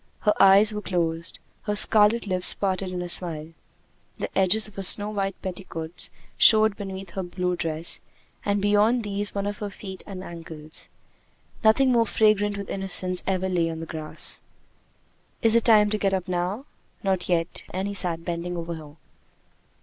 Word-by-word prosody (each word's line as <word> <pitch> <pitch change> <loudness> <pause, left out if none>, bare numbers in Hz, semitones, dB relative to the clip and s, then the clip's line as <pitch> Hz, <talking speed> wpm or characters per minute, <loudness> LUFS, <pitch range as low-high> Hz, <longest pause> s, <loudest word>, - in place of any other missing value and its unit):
Her 210 - +2
eyes 200 +2 +6
were 210 - -4
closed, 170 -3 -3 0.3
her 210 -1 -1
scarlet 215 +2 +4
lips 185 -2 +5
parted 190 -1 -2
in 180 -1 -4
a - - -5
smile. 165 -3 +3 0.7
The - - -6
edges 195 +3 +3
of 210 - -16
her 195 - -6
snow 205 +2 +4
white 195 -2 -3
petticoats 175 -3 -5 0.3
showed 220 -2 +6
beneath 195 -3 -8
her 190 - -4
blue 180 0 -3
dress, 165 0 -1 0.4
and 205 0 0
beyond 210 +4 +2
these 205 0 -2
one 200 0 -2
of 205 0 -4
her 205 - -4
feet 190 -1 -9
and 190 -2 -8
ankles. 160 -3 -8 0.7
Nothing 255 +4 +4
more 230 -2 +2
fragrant 205 -1 +2
with 200 - -7
innocence 190 -2 0
ever 190 -1 -1
lay 175 -3 0
on 160 -1 -6
the 165 - -6
grass. 155 -1 -1 1.0
"Is 225 -1 +4
it 230 -1 +2
time 210 -3 +5
to 215 - -1
get 195 -1 +1
up 185 0 -4
now?" 185 +8 -3 0.4
"Not 190 -2 -1
yet," 165 -1 -1
and 190 +2 -4
he 205 - -4
sat 170 -4 0
bending 175 0 -4
over 170 0 -5
her. 155 -2 -11
190 Hz, 175 wpm, -24 LUFS, 175-205 Hz, 1.0 s, eyes